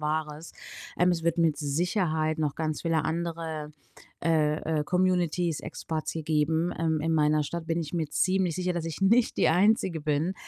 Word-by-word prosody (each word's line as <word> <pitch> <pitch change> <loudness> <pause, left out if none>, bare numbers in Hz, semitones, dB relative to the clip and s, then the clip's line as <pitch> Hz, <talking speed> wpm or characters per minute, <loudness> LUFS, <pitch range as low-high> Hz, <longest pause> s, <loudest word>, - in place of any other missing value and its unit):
Wahres. 155 +1 -3 0.5
Ähm, 180 +1 +4
es 170 -2 -1
wird 170 0 +1
mit 165 -3 +3
Sicherheit 155 +1 0
noch 150 -3 0
ganz 155 -2 -3
viele 165 -2 +1
andere, 160 -2 -3 0.5
äh, 155 -1 +1
äh, - - -2
Communities, 180 -2 +1
Expats 160 -1 -4
hier 160 - -4
geben. 160 +2 +1
Ähm, 160 -1 0
in 165 +1 0
meiner 150 -1 +3
Stadt 165 +3 -5
bin 165 +1 0
ich 155 -1 -6
mir 165 -3 -1
ziemlich 185 0 +1
sicher, 180 +1 -1
dass 170 -2 -3
ich 165 0 -5
nicht 225 +5 +3
die - - +3
Einzige 185 -1 +2
bin. 150 +4 0
160 Hz, 180 wpm, -27 LUFS, 155-175 Hz, 0.5 s, Ähm